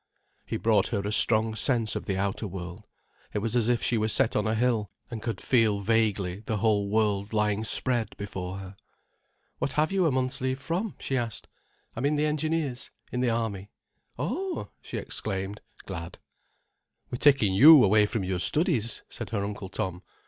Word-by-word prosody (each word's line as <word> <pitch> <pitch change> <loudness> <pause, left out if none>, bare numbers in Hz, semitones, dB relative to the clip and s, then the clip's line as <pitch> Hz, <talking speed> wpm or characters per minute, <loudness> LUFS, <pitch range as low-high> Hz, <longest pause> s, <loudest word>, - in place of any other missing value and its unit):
He - - -2
brought - - +2
her 100 - -1
a 100 +1 -3
strong 110 +1 +4
sense 115 -1 +1
of - - -4
the 95 -2 -1
outer 100 +2 -2
world. 90 -2 -8 0.5
It - - +2
was 115 +3 -2
as 120 -1 +2
if 120 -1 +1
she 115 - +1
were 110 - +1
set 115 +2 +1
on 105 +1 +1
a 110 - +1
hill 115 -3 +1 0.2
and 115 -2 -5
could 110 -4 -3
feel 110 -5 +2
vaguely 100 -3 0
the 110 - 0
whole 105 -2 +1
world 105 -1 0
lying 105 0 +1
spread 115 -3 -1
before 95 -2 -5
her. 95 0 -9 0.8
"What 140 - -1
have 155 +3 +1
you 190 -3 +2
a - - +2
month's 130 0 -1
leave 130 +1 -1
from?" 175 +10 -3
she 135 - -3
asked. 115 -4 -3 0.5
"I'm 125 +5 0
in 150 - +1
the 150 +1 +1
Engineers—in 150 -5 -3
the 125 - +2
Army." 110 -4 -2 0.5
"Oh!" 330 - -3
she - - -6
exclaimed, 95 +2 -4 0.2
glad. 85 -2 -7 0.9
"We're 125 - -4
taking 135 -9 +4
you 145 +8 +9
away 105 +1 +4
from 110 -3 -2
your 95 -1 -2
studies," 125 - +1
said - - -7
her 105 -4 -2
Uncle 100 -2 -5
Tom. 95 -2 -4
110 Hz, 180 wpm, -27 LUFS, 100-130 Hz, 0.9 s, you